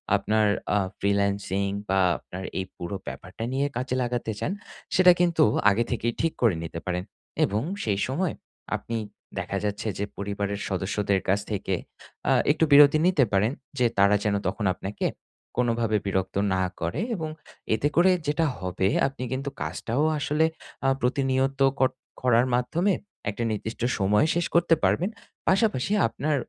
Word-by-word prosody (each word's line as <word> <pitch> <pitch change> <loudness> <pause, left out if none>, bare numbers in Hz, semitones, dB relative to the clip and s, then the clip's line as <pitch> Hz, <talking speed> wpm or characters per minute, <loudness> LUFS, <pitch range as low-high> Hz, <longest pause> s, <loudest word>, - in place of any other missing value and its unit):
আপনার 105 +2 +2 0.3
আ - - +4 0.2
freelancing 100 -1 0 0.2
বা 95 0 +3 0.2
আপনার 95 +1 -9 0.2
এই 95 - -2
পুরো 85 +3 -4
ব্যাপারটা 95 +4 -7
নিয়ে 140 +2 +1
কাজে 130 0 -2
লাগাতে 120 -2 -2
চান - - -1 0.4
সেটা 180 -1 +8
কিন্তু 175 -2 +4 0.3
আগে 105 +3 +2
থেকেই 120 -1 0
ঠিক 165 -1 +1
করে 115 -7 +4
নিতে 85 0 -5
পারেন 90 0 -2 0.4
এবং 105 +2 -1 0.2
সেই 100 -3 0
সময় 165 +6 -1 0.4
আপনি 115 - -4 0.4
দেখা 95 +1 -3
যাচ্ছে 105 +1 -2
যে 100 - -1
পরিবারের 100 0 -3
সদস্যদের 95 +1 0
কাছ 95 +2 +3
থেকে 95 -2 -1 0.5
আ - - +4 0.2
একটু 155 - +1
বিরতি 145 +1 +8
নিতে 180 -7 +4
পারেন 100 +4 +3 0.3
যে 125 - +4
তারা 100 +1 +5
যেন 105 -1 +1
তখন 105 +2 -2
আপনাকে 100 +2 -4 0.5
কোনোভাবে 115 -3 +1
বিরক্ত 95 -1 -1 0.2
না 95 0 +1 0.2
করে 85 - -1
এবং 160 -4 -3 0.5
এতে 140 - +1
করে 180 +3 +6 0.2
যেটা 150 +3 +2
হবে 90 0 -1 0.2
আপনি 135 -1 -6
কিন্তু 135 +2 -2
কাজটাও 120 +6 -1 0.2
আসলে 150 +2 +2 0.4
আ - - +5
প্রতিনিয়ত 135 +1 +1 0.2
কর 130 - +4 0.3
করার 125 -1 +4
মাধ্যমে 170 +11 +1 0.4
একটা 110 +3 -3
নির্দিষ্ট 110 +2 -4 0.2
সময় 105 +7 +3
শেষ 175 -1 +1
করতে 170 -1 +5
পারবেন। 180 +5 +2 0.4
পাশাপাশি 195 - +2 0.2
আপনার 150 0 -1
115 Hz, 150 wpm, -26 LUFS, 100-140 Hz, 0.5 s, সেটা